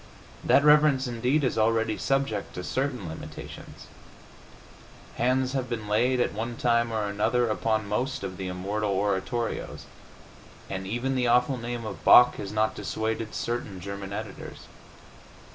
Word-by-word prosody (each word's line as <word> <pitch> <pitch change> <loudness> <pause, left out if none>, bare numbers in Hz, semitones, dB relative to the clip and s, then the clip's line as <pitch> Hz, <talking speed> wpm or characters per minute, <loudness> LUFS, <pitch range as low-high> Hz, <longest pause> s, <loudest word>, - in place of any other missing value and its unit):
That 140 - +4
reverence, 150 -3 +5
indeed, 125 +5 0
is 125 -3 0
already 110 0 +2
subject 135 -7 -1
to 90 - -5
certain 130 -4 -2
limitations; 80 - -9 1.3
hands 130 +2 +1
have 130 -2 -2
been 110 -3 -4
laid, 125 +5 +2
at - - +1
one 115 +3 -4
time 115 -1 +2
or 110 -2 -1
another, 110 +4 +1
upon 110 -1 0
most 125 +4 -2
of 95 -2 -5
the 95 - -4
immortal 100 +4 -2
oratorios, 100 +4 -2 0.9
and 95 0 -4
even 120 +6 -1
the 125 -2 +1
awful 125 +2 +3
name 120 -1 -5
of - - -7
Bach 125 0 +7
has 100 - -5
not 110 0 +1
dissuaded 110 0 -3
certain 115 -5 -3
German 100 +1 -6
editors. 105 0 -7
115 Hz, 145 wpm, -27 LUFS, 105-125 Hz, 1.3 s, Bach